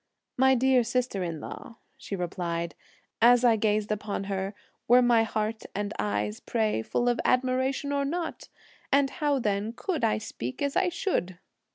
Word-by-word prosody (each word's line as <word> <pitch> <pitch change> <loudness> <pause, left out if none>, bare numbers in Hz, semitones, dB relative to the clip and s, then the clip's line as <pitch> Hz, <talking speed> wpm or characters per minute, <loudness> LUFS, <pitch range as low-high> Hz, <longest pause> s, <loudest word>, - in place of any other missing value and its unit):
"My 265 +1 +5
dear 260 0 +4
sister 240 -3 -1
in 165 -3 -4
law," 230 - -9 0.2
she 270 -6 -6
replied, 170 -2 -3 0.5
"as 245 +1 +6
I 235 -2 +6
gazed 215 -1 0
upon 210 -1 -2
her, 195 0 -3 0.3
were 250 +1 +6
my 240 -2 +5
heart 220 0 -2
and 205 0 -2
eyes, 105 +1 -1
pray, 220 - 0
full 240 - -1
of 240 -1 +2
admiration 260 +2 +1
or 280 0 +1
not? 330 +4 -4 0.4
and 275 0 +3
how 295 -4 0
then 210 -2 -1
could 335 +4 -3
I 105 - +3
speak 120 +3 -6
as 280 -1 -1
I 370 - +3
should?" 185 - -2
225 Hz, 165 wpm, -27 LUFS, 195-260 Hz, 0.5 s, as